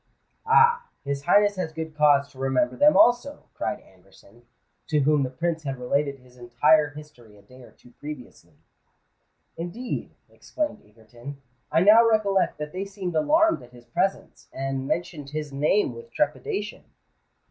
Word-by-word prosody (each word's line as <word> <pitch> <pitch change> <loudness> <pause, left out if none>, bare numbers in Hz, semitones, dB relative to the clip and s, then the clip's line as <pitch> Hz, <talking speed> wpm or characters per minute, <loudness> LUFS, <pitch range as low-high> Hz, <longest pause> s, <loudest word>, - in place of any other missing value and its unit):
"Ah! 470 +1 +4 0.2
his 140 0 -4
Highness 205 -1 +4
has 170 -3 -3
good 160 -1 -7
cause 145 -2 +4
to 130 - -17
remember 135 - 0
them 295 +1 +5
also!" 280 -1 +3
cried 130 - -4
Anderson, 100 +5 -22 0.4
to 150 -2 +1
whom 150 +1 +3
the 130 - -1
Prince 165 +5 -2
had 135 -3 -5
related 140 +3 -1
his 125 -1 -21
entire 145 +6 +3
history 145 -8 -14
a 100 - -20
day 125 +5 -17
or 125 - -14
two 125 - -21
previously. 145 -4 -10 1.0
"Indeed," 185 +9 -5
exclaimed 300 -9 -5
Egerton, 120 +6 -12 0.3
"I 160 - +3
now 215 +5 +7
recollect 215 -4 +1
that 150 0 -6
they 190 +2 -4
seemed 195 -3 -6
alarmed 320 - +3
at 120 0 -16
his 120 -1 -16
presence, 190 +11 -3
and 135 0 -4
mentioned 165 -4 -3
his 150 0 -5
name 150 +9 +1
with 465 0 -11
trepidation." 415 -3 -3
150 Hz, 155 wpm, -25 LUFS, 130-200 Hz, 1.0 s, now